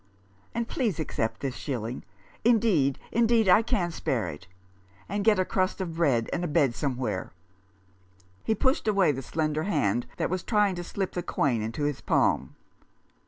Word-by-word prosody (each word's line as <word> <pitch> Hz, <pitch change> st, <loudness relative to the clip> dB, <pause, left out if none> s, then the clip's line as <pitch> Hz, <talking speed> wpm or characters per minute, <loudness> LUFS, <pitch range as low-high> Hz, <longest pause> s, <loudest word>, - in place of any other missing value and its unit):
And 235 Hz, 0 st, -1 dB
please 220 Hz, -, -1 dB
accept 115 Hz, -7 st, -2 dB
this 135 Hz, -2 st, -2 dB
shilling 120 Hz, -3 st, -4 dB, 0.2 s
— -, -, -28 dB
indeed, 175 Hz, -, +2 dB
indeed, 230 Hz, -1 st, +3 dB
I 190 Hz, +4 st, +7 dB
can 210 Hz, -7 st, 0 dB
spare -, -, -1 dB
it 75 Hz, +5 st, -10 dB, 0.3 s
— 95 Hz, 0 st, -30 dB
and 200 Hz, +2 st, -2 dB
get 215 Hz, -1 st, +4 dB
a 185 Hz, -, +2 dB
crust 185 Hz, +1 st, 0 dB
of 170 Hz, -4 st, -4 dB
bread 130 Hz, -9 st, +2 dB
and 175 Hz, -, -1 dB
a -, -, 0 dB
bed 145 Hz, -5 st, +2 dB
somewhere." 125 Hz, -8 st, -3 dB, 1.1 s
He 220 Hz, -, +1 dB
pushed 260 Hz, +1 st, +1 dB
away 195 Hz, -6 st, +4 dB
the 135 Hz, -1 st, -4 dB
slender 155 Hz, +2 st, -1 dB
hand 120 Hz, -, 0 dB
that -, -, -1 dB
was 185 Hz, -1 st, -1 dB
trying 210 Hz, -2 st, +2 dB
to 175 Hz, -1 st, -5 dB
slip 195 Hz, +2 st, -3 dB
the 175 Hz, -, -3 dB
coin 135 Hz, -8 st, 0 dB
into 115 Hz, +7 st, -3 dB
his 145 Hz, -2 st, -1 dB
palm. -, -, +1 dB
165 Hz, 175 wpm, -27 LUFS, 130-205 Hz, 1.1 s, I